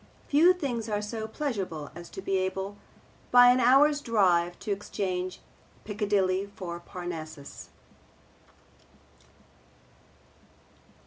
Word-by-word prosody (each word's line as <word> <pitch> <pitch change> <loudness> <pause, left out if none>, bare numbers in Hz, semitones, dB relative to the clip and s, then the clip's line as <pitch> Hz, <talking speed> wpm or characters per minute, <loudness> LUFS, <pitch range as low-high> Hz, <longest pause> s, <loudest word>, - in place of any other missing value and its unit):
Few 315 +5 +6
things 250 -11 -3
are 210 -1 0
so 220 +1 -5
pleasurable 200 - -4
as 170 +2 -10
to 190 - -8
be 195 - -1
able 190 +2 -3 0.5
by 245 0 +8
an 250 - +3
hour's 285 +4 +5
drive 180 -8 +2
to 210 - -4
exchange 185 -2 -3 0.4
Piccadilly 200 -2 0
for 175 -4 -6
Parnassus. 170 -5 -8
200 Hz, 100 wpm, -28 LUFS, 180-235 Hz, 0.5 s, by